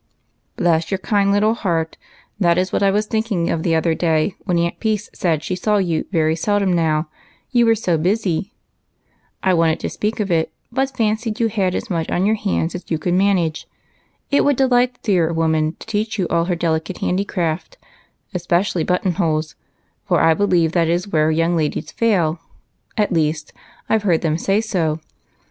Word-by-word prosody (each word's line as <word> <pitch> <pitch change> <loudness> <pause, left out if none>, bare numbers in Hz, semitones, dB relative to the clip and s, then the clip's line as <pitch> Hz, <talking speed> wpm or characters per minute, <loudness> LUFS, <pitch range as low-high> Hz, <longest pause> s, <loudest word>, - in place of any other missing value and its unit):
Bless 165 -1 +1
your 195 - 0
kind 200 +1 +1
little 210 +2 +3
heart, 170 -7 -1 0.4
that 170 -3 +3
is 185 +1 0
what - - +1
I 200 - +4
was 210 +2 +1
thinking 215 -6 -1
of 165 - -1
the 165 -1 +1
other 160 +1 +2
day 160 +2 +1
when 180 -4 +1
Aunt 170 0 -1
Peace 215 -2 -1
said 160 -5 0
she 185 - -2
saw 210 +3 +1
you 175 -5 -1
very 160 -3 +2
seldom 200 +2 +1
now, 160 -2 +1 0.4
you 240 -2 +4
were 225 - +5
so 175 -6 0
busy. 190 +1 0 0.9
I 190 - +3
wanted 165 -2 +2
to - - -3
speak 215 +2 -2
of 200 -3 -1
it, 160 -1 +1 0.2
but 265 +1 -1
fancied 220 +1 -1
you 230 -1 +2
had 195 -4 0
as 230 - -4
much 165 -2 -1
on 180 - +1
your 215 - +3
hands 200 -6 -1
as 180 - -8
you 160 - 0
could 175 +3 -1
manage. 185 -4 +1 0.6
It 285 - +4
would 285 -1 +3
delight 250 -1 +3
the - - -31
dear 175 -6 +2
woman 160 -1 +1
to - - -12
teach 220 0 -2
you 185 -4 0
all 170 0 +2
her 180 0 0
delicate 165 +1 -1
handicraft, 180 - -2 0.6
especially 175 0 0
button 180 +2 0
holes, 160 -4 -1 0.5
for - - +3
I 165 0 +5
believe 175 -3 +2
that 170 -2 +1
is 175 +4 0
where 155 -3 +2
young 165 +2 +1
ladies 155 -1 -2
fail; 180 -8 +1 0.6
at 210 -3 +1
least 155 -1 -1 0.3
I 220 - +2
've - - -11
heard 180 -6 +2
them 160 -1 0
say 195 +4 +1
so. 165 -8 -1
180 Hz, 190 wpm, -20 LUFS, 165-210 Hz, 0.9 s, were